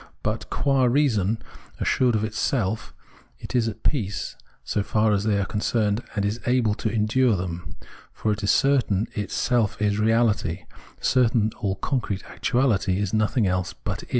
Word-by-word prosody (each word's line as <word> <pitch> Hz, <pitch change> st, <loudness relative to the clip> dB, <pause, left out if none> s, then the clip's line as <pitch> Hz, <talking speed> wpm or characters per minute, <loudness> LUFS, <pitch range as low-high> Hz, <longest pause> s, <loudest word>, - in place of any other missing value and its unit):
But -, -, -2 dB
qua 135 Hz, -2 st, +2 dB
reason, 120 Hz, -6 st, +2 dB, 0.4 s
assured 125 Hz, -3 st, +2 dB
of 105 Hz, -, 0 dB
itself, 110 Hz, -1 st, -1 dB, 0.5 s
it -, -, -7 dB
is 120 Hz, -2 st, +3 dB
at 110 Hz, 0 st, -6 dB
peace 105 Hz, -9 st, -1 dB, 0.3 s
so 105 Hz, -, -1 dB
far 105 Hz, +1 st, +2 dB
as 100 Hz, 0 st, +1 dB
they 105 Hz, -2 st, +2 dB
are 100 Hz, -, 0 dB
concerned, 105 Hz, +1 st, 0 dB
and 100 Hz, -1 st, 0 dB
is 105 Hz, +3 st, -1 dB
able 120 Hz, -4 st, +3 dB
to 110 Hz, -, -2 dB
endure 115 Hz, +2 st, +2 dB
them; 90 Hz, -1 st, -5 dB, 0.4 s
for 110 Hz, -, -1 dB
it 105 Hz, -, -2 dB
is 100 Hz, -, -1 dB
certain 125 Hz, -8 st, +3 dB
its 105 Hz, -1 st, -4 dB
self 120 Hz, -5 st, +1 dB
is 105 Hz, 0 st, +1 dB
reahty, 110 Hz, -6 st, +1 dB, 0.3 s
certain 120 Hz, -4 st, +3 dB
that -, -, -16 dB
all 95 Hz, -2 st, -1 dB
concrete 100 Hz, -3 st, -2 dB
actuahty 110 Hz, -7 st, +1 dB
is 100 Hz, -1 st, -2 dB
nothing 110 Hz, +1 st, +2 dB
else 90 Hz, -1 st, -1 dB
but -, -, -5 dB
it. -, -, -14 dB
110 Hz, 170 wpm, -24 LUFS, 100-120 Hz, 0.5 s, is